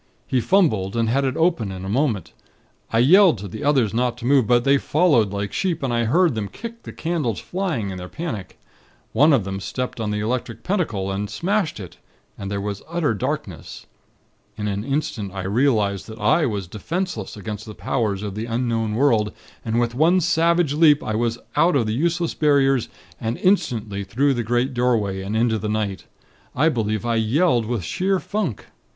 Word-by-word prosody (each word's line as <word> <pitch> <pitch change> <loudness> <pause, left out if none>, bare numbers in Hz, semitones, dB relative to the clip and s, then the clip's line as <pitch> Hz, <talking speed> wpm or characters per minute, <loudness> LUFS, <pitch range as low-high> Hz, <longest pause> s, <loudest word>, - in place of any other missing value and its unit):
He 130 - 0
fumbled, 115 - +2
and 115 -1 +1
had 135 +4 +1
it 130 - -1
open 160 - +1
in 95 0 -7
a - - -4
moment. 110 - -1 0.6
I 115 - +1
yelled 170 - +6
to 100 +1 -7
the 105 +3 -7
others 135 -8 +2
not 120 +1 0
to - - -8
move; 130 -3 +4
but 120 -1 +4
they 140 +1 +4
followed 150 - +3
like 100 0 -4
sheep, 170 -6 -1
and 130 -3 0
I 120 0 +1
heard 165 +6 +3
them 110 -3 -3
kick 230 - -9
the - - -9
candles 160 - -2
flying, 170 - -3
in 95 - -6
their 90 0 -8
panic. 140 - -6 0.5
One 150 +8 +5
of 135 -8 +3
them 95 0 -4
stepped 125 +5 -4
on 110 -2 -2
the 105 0 -1
Electric 115 0 -3
Pentacle, 115 - -1
and 100 +1 -3
smashed 180 - -1
it, 90 -5 -9 0.4
and 100 - -6
there 100 0 -2
was 100 0 -4
an - - -22
utter 170 -7 0
darkness. 100 - -5 0.7
In 105 -1 -3
an 100 0 -2
instant, 125 -7 -2
I 95 - -3
realized 105 -2 +1
that 110 -1 -9
I 155 +6 +3
was 100 -5 -3
defenseless 115 - -4
against 105 +2 -6
the 105 - -8
powers 105 -6 -1
of 100 -2 -4
the 110 +3 -4
Unknown 115 -2 -1
World, 115 -5 +2 0.3
and 115 0 0
with 120 -1 0
one 165 +8 +4
savage 170 -2 +2
leap 150 -1 +5
I 110 - -2
was 115 +1 0 0.2
out 175 0 +4
of 125 -5 +2
the 110 - -1
useless 170 +6 0
Barriers, 135 -5 +2 0.3
and 115 0 -2
instantly 120 - 0
through 135 +8 +1
the 120 - -1
great 120 +3 0
doorway, 115 -6 0
and 100 +3 -3
into 115 -1 +2
the 105 +1 -3
night. 105 -3 -2 0.5
I 155 +5 +4
believe 110 -6 -1
I 115 -1 +1
yelled 120 +1 +2
with 115 -5 -2
sheer 190 - 0
funk. 195 - -3
120 Hz, 195 wpm, -22 LUFS, 105-150 Hz, 0.7 s, yelled